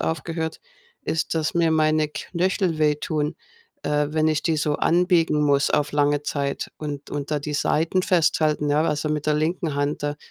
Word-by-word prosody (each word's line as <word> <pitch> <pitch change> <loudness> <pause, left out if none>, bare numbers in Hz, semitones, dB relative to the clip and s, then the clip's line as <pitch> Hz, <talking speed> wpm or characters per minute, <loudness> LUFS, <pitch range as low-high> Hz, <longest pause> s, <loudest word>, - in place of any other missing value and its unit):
aufgehört, 160 0 -3 0.4
ist, 160 -10 -1
dass 155 -1 -1
mir 170 -1 +3
meine 155 -1 +2
Knöchel 175 +1 -1
wehtun, 150 0 0 0.5
äh, 150 0 +1
wenn 155 0 +1
ich 155 0 0
die 160 -2 +1
so 150 -1 0
anbiegen 170 -3 +2
muss 140 -1 +2
auf 150 0 +1
lange 145 0 +2
Zeit 140 -1 -3
und 145 -2 -6
und 145 0 -4
da 150 - +1
die 150 +1 -4
Seiten 165 +5 +1
festhalten, 155 -4 +2
ja, 150 +2 +3
also, 150 -1 -1
mit 150 -1 -2
der 155 - +3
linken 160 0 -1
Hand 145 +1 -1
da. 145 0 -2
155 Hz, 175 wpm, -23 LUFS, 150-160 Hz, 0.5 s, mir